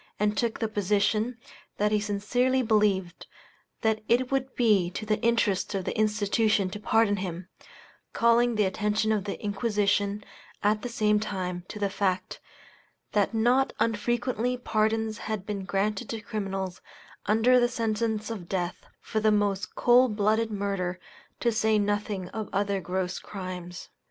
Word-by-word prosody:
and 210 0 +1
took 230 +1 0
the 225 - -1
position, 210 +3 0 0.4
that 210 +1 +1
he 210 - +3
sincerely 245 +6 +1
believed, 205 -5 +1 0.5
that 220 -1 +1
it 250 +2 +2
would 265 -1 -1
be 210 -7 +3
to 190 +4 -6
the 215 0 0
interest 220 -4 +1
of 190 -2 -2
the - - -2
institution 215 -2 +1
to 210 - -6
pardon 220 -1 +2
him; 180 -1 -5 0.6
calling 235 0 +3
the 210 -1 +3
attention 210 +3 0
of 210 -2 0
the 200 - -4
Inquisition, 205 -1 0 0.4
at 210 +1 +2
the 245 - -4
same 210 -2 +2
time, 185 -4 -3
to - - -8
the 205 -1 0
fact, 190 -2 -1 0.7
that 205 +2 +1
not 245 +4 +3
unfrequently 240 +2 0
pardons 220 -2 0
had 215 -3 -3
been 200 -3 -4
granted 205 +3 -1
to 225 - -3
criminals, 195 -4 -4 0.5
under 240 +4 +4
sentence 225 -2 -1
of 190 -6 -7
death, 180 -2 -3
for 220 - -2
the 215 0 +3
most 205 0 0
cold 245 -2 +4
blooded 220 +2 +2
murder, 195 -3 -2 0.4
to 235 - +2
say 220 0 +2
nothing 205 -2 -1
of 220 -2 -5
other 200 0 0
gross 180 0 -2
crimes. 180 -2 -7
210 Hz, 150 wpm, -27 LUFS, 200-225 Hz, 0.7 s, under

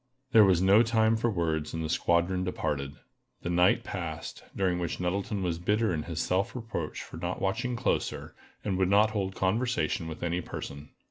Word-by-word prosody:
There 110 -2 +8
was 95 -2 +4
no 100 +4 +7
time 110 -1 +3
for 120 +1 +1
words, 80 -6 -1
and 80 -1 -2
the - - -1
squadron 85 +2 +1
departed. 70 -6 -2 0.5
The 85 - -2
night 90 +1 +4
passed, - - -5
during 90 -2 +1
which 85 - -3
Nettleton 95 +2 -1
was 85 -2 -1
bitter 105 +2 +1
in 80 - -1
his 80 0 -5
self 95 +6 0
reproach 110 -10 -4
for - - -10
not - - -3
watching 120 +6 -1
closer, 120 - -1 0.3
and 95 -3 0
would 95 -1 +3
not 105 +2 +5
hold 95 -3 -2
conversation 110 -2 0
with 80 - -7
any 85 +1 0
person. 70 -3 -7
95 Hz, 185 wpm, -29 LUFS, 85-105 Hz, 0.5 s, There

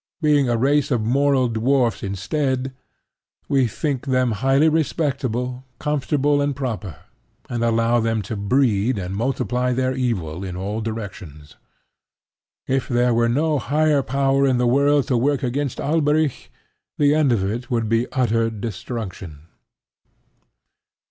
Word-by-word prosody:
Being 145 -5 +3
a 120 - +1
race 140 +3 +2
of 120 -5 0
moral 135 +2 +2
dwarfs 120 +2 +1
instead, 130 +7 -2 0.7
we 135 -3 +2
think 140 +3 -3
them 130 -2 +2
highly 135 +7 +2
respectable, 135 -6 -1
comfortable 145 0 0
and 140 -1 0
proper, 110 - -4 0.6
and 120 -1 -1
allow 115 +1 +2
them 115 -2 0
to 110 - -5
breed 110 +1 +1
and 95 0 -4
multiply 125 +2 -1
their 130 +1 0
evil 95 -10 -2
in 90 -2 -5
all 100 +4 -3
directions. 90 -10 -7 1.1
If 135 0 -1
there 120 -1 +2
were 115 0 +2
no 150 +4 +1
higher 150 +2 +2
power 135 +2 +1
in 130 -2 +2
the 125 - +1
world 140 +2 +3
to 125 - +2
work 135 +2 +1
against 135 +1 -2
Alberic, 150 -1 0 0.5
the 145 -1 +4
end 150 -3 +3
of 110 -5 +1
it 115 +5 -3
would 115 -3 0
be 115 +2 0
utter 115 -3 +1
destruction. 100 - -6
125 Hz, 135 wpm, -21 LUFS, 115-140 Hz, 1.1 s, the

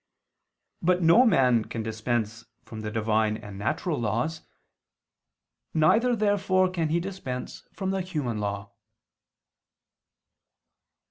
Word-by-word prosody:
But 180 +1 +2
no 200 +10 +6
man 125 - +3
can 115 - -5
dispense 110 0 -2 0.2
from 110 - -8
the 105 - -4
Divine 110 0 +1
and 100 -3 -10
natural 145 - -1
laws. 120 +9 -1 1.3
Neither, 225 +11 +4
therefore, 195 -3 +2
can 165 -4 -1
he 165 +2 +2
dispense 170 -9 -6
from 190 -2 -2
the 195 0 -1
human 150 -12 -3
law. 100 -1 -4
130 Hz, 110 wpm, -26 LUFS, 110-185 Hz, 1.3 s, no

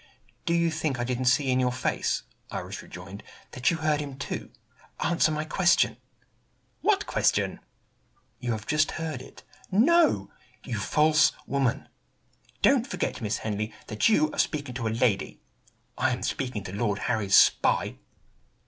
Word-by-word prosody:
"Do 170 - +2
you 170 -1 +2
think 155 -5 -2
I - - 0
didn't 125 +1 -2
see 130 +2 +3
in 130 - +2
your 125 -1 +2
face," 125 0 -1 0.3
Iris - - -5
rejoined, 90 +3 -10 0.3
"that 125 0 +1
you 170 - 0
heard 155 -2 +1
him, 140 -2 -7
too? 140 - -5 0.5
Answer 170 -2 +2
my 155 0 -2
question." 185 +3 +3 0.8
"What 410 -2 +2
question?" - - +1 0.8
"You 120 -2 -2
have 110 -1 -5
just 155 -1 +1
heard 160 -1 -4
it." - - -14 0.3
"No!" 220 - +4 0.3
"You 115 -5 -4
false 155 +7 +3
woman!" 135 -4 0 0.8
"Don't - - +4
forget, - - -3
Miss 105 0 -1
Henley, 110 0 -3
that 105 - +2
you 155 -8 +3
are - - -6
speaking 145 -4 -1
to 120 -2 -3
a - - +1
lady." 115 -5 0 0.6
"I - - +3
am - - -3
speaking 125 -7 -3
to 95 - -7
Lord 105 -1 0
Harry's 100 -3 +2
spy!" - - +3
130 Hz, 155 wpm, -27 LUFS, 110-155 Hz, 0.8 s, No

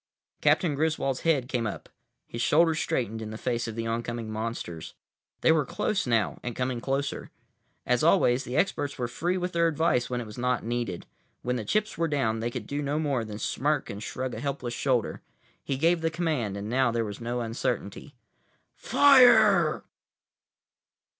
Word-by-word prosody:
Captain 170 -6 +3
Griswold's 145 -3 0
head 145 -7 +1
came 120 -3 -1
up; - - -6 0.4
his 115 - -6
shoulders 160 +3 +3
straightened 110 -2 -2
in 110 - -5
the 110 - -6
face 120 0 -2
of 110 - -5
the 115 0 -3
oncoming 115 0 -3
monsters. 110 -7 -5 0.5
They - - +5
were 160 -2 +3
close 195 +5 -1
now, 115 -3 +1
and 120 -2 -5
coming 125 -1 -2
closer. 135 +2 -2 0.6
As - - +2
always, 125 +2 +4
the 125 +2 -4
experts 145 -5 0
were 125 -2 -2
free 175 +10 -1
with 180 0 -2
their 170 0 +3
advice 155 -6 +1
when 125 -1 -2
it 120 - -5
was 105 +2 -9
not 125 0 0
needed. 115 -6 -3 0.4
When 125 0 -1
the 120 - -3
chips 210 - -1
were 165 - +2
down, 115 -7 0
they 115 +1 -1
could 120 -3 -6
do 145 +5 -3
no 145 +1 -1
more 140 -6 0
than 105 -2 -7
smirk 145 +7 -1
and 100 +1 -7
shrug 130 +2 -4
a - - -5
helpless 140 -4 -3
shoulder. 125 -3 0 0.4
He 135 - -2
gave 165 +3 +2
the 165 - +1
command, 155 - -2
and 100 +1 -5
now 130 +2 +2
there 115 -1 -1
was 105 +2 -7
no 120 +1 -2
uncertainty. 120 +2 -3 0.6
"Fire!" 260 -1 +5
125 Hz, 180 wpm, -27 LUFS, 115-150 Hz, 0.6 s, They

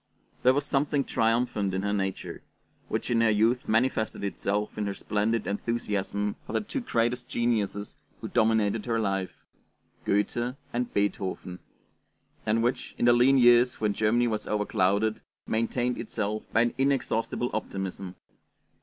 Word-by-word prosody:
There 130 +1 +5
was 145 0 0
something 145 0 +1
triumphant 115 -5 0
in 95 - -1
her 100 0 0
nature, 95 -2 -3 0.5
which - - -2
in 115 -1 +3
her 115 - +4
youth 110 +4 +2
manifested 110 -1 +1
itself 100 +1 -2
in 105 -1 -2
her 100 - -3
splendid 105 +1 -1
enthusiasm 105 -1 -2
for - - -6
the - - +1
two 275 +7 -4
great 120 - +1 0.2
geniuses 110 -4 -1 0.2
who - - -5
dominated 110 0 +1
her 115 -1 +1
life, 95 -4 -2 0.6
Goethe 120 +5 0 0.2
and 120 +1 -1
Beethoven, 95 -2 -2 0.9
and 115 +2 +2
which, 125 +2 -2
in - - +1
the 120 - +7
lean 125 +3 +5
years 120 0 +5
when 105 -2 +1
Germany 115 +3 +2
was 110 -2 -2
overclouded, 105 +1 +1 0.2
maintained 120 +2 -1
itself 110 -1 -3
by 115 - +3
an 120 0 +1
inexhaustible 130 -3 0
optimism. 95 -3 -4
110 Hz, 145 wpm, -27 LUFS, 100-120 Hz, 0.9 s, the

